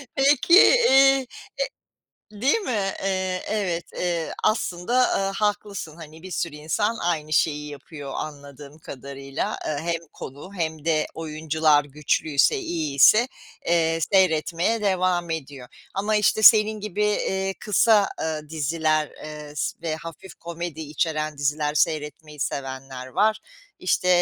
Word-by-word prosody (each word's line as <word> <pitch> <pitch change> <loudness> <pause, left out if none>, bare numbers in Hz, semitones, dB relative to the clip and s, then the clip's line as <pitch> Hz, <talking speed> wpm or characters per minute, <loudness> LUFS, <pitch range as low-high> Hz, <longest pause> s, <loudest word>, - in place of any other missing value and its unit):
Peki, 280 +5 +4
iii, 485 +4 +7
e 270 -1 +5 1.1
değil 260 - +1
mi? 205 - -1
Eee, 185 -1 -1
evet, 185 -6 -1
eee, 170 -2 -2
aslında, 200 0 0
aaa, 195 0 0
haklısın. 205 -6 -2
Hani, 160 -1 -12
bir 185 - -9
sürü 160 -2 -3
insan 205 +9 -1
aynı 155 -3 -2
şeyi 150 -1 +1
yapıyor, 145 -1 -9
anladığım 145 0 -8
kadarıyla. 140 0 -6
Eee, 150 - -1 0.2
hem 165 - -2
konu 145 +8 -9
hem 160 -2 -3
de 155 -2 +1
oyuncular 155 -1 +1
güçlüyse, 145 0 +1
iyiyse, 165 - +3 0.4
eee, 165 -1 +2
seyretmeye 185 +4 +2
devam 185 -3 +1
ediyor 140 -5 -6 0.3
ama 210 +2 0
işte 210 +1 +2
senin 215 0 +6
gibi, 210 0 -3
eee, 195 -2 -1
kısa 210 -1 +3 0.4
diziler, 155 0 0 0.2
eee, 150 -1 -8
s - - -2
ve 160 -2 -2
hafif 165 +3 -10
komedi 170 -2 -6
içeren 155 -1 -2
diziler 150 +1 0
seyretmeyi 150 -1 -2
sevenler 130 -2 -5
var; 215 +10 +1 0.4
işte, 180 0 0
165 Hz, 125 wpm, -24 LUFS, 150-195 Hz, 1.1 s, iii